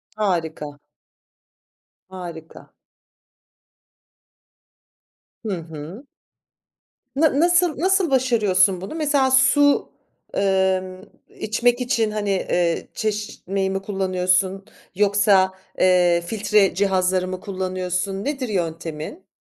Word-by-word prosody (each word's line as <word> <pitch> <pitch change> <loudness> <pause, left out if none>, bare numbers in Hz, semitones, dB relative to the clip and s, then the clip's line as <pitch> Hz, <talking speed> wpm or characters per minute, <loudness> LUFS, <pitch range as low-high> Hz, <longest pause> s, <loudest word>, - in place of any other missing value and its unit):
Harika. 160 -8 -2 1.3
Harika. 170 -4 -10 2.7
Hı - - -2
hı. 160 - -10 1.1
Na 290 -1 +2
nasıl 345 -2 +3
nasıl 375 -1 +2
başarıyorsun 205 -8 +2
bunu? 195 +11 -7
Mesela, 285 -4 +1
su, 285 +2 +4 0.4
emm, 190 -1 0 0.4
içmek 240 +3 +1
için, 230 -3 0
hani, 210 -1 -3
eee, 175 -3 0
çeşmeyi 205 -3 -3
mi 195 0 -2
kullanıyorsun 190 -1 0 0.3
yoksa, 200 -1 +3 0.3
eee, 180 -2 +4
filtre 210 0 +2
cihazları 185 -1 +1
mı 185 0 -5
kullanıyorsun? 185 0 -3
Nedir 275 -4 -3
yöntemin? 165 - -4
195 Hz, 85 wpm, -22 LUFS, 185-230 Hz, 2.7 s, su